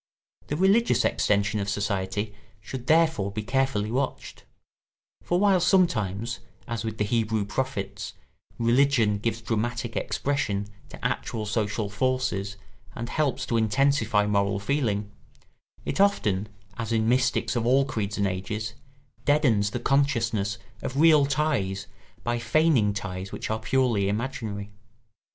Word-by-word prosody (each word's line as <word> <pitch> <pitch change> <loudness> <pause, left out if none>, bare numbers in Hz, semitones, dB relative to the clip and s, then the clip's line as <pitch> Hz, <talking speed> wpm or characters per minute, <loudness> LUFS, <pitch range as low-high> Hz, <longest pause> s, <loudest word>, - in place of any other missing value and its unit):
The 150 - -2
religious 200 +6 +3
extensions 105 0 +1
of 100 - -2
society 100 0 -2 0.3
should 125 +4 -7
therefore 160 -11 +3
be 105 +1 -4
carefully 120 -3 0
watched; 130 +2 -3 0.8
for 175 - 0
while 195 -2 +4
sometimes, 115 - +1 0.3
as 115 -3 -3
with 110 -1 -4
the 105 - +1
Hebrew 110 -1 0
prophets, 105 -4 -3 0.4
religion 115 -3 +3
gives 115 +1 -2
dramatic 120 +1 -2
expression 105 -8 -1 0.2
to - - -10
actual 110 -2 -2
social 105 0 -1
forces 105 -3 -1 0.4
and 120 0 -5
helps 135 -4 0
to 115 - 0
intensify 115 -2 +2
moral 100 -1 +1
feeling, 105 -4 -1 0.7
it - - 0
often, 105 - +2 0.3
as 115 0 -3
in 110 -1 +2
mystics 125 +2 +2
of 120 -1 0
all 135 +2 +4
creeds 110 -6 -3
and 100 - +1
ages, 105 +4 -3 0.5
deadens 125 -9 +3
the - - -3
consciousness 115 -7 +1 0.2
of 135 +3 -3
real 155 -3 +6
ties 135 -10 0 0.4
by 120 0 -1
feigning 120 -2 +3
ties 95 -2 -5
which - - -4
are 110 - -1
purely 110 -4 +1
imaginary. 105 -3 -3
115 Hz, 130 wpm, -26 LUFS, 105-135 Hz, 0.8 s, real